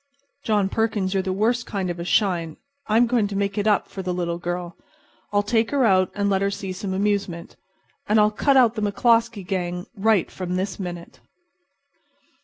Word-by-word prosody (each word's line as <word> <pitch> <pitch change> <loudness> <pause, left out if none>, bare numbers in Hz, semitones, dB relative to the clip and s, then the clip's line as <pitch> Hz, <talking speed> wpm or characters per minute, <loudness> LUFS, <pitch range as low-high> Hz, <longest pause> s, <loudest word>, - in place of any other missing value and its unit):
John 210 -3 +1
Perkins, 210 -2 -1
you're 195 - +1
the 190 0 -3
worst 230 +6 0
kind 190 -3 -2
of 175 - -7
a - - -3
shine. 175 -4 0 0.3
I'm 225 +3 +4
going 230 -3 +1
to 200 - -6
make 200 0 -1
it 210 0 -1
up 210 -2 +2
for 195 - -7
the 180 -1 -3
little 170 -1 -2
girl. 175 0 -4 0.6
I'll 205 0 +2
take 225 +2 +1
her 275 -3 +2
out 185 -3 +3
and 205 0 0
let 195 -1 +1
her 200 - +2
see 195 -1 -5
some 190 +1 -5
amusement. 195 -4 -2 0.5
And 215 +1 +4
I'll 210 0 +4
cut 270 +6 +2
out 240 -4 +5
the 220 - -4
McCloskey 230 0 +2
gang 180 -1 -3
right 210 -2 +2
from 180 -1 -4
this 190 +1 -3
minute." 175 -2 -7
200 Hz, 195 wpm, -23 LUFS, 185-215 Hz, 0.6 s, out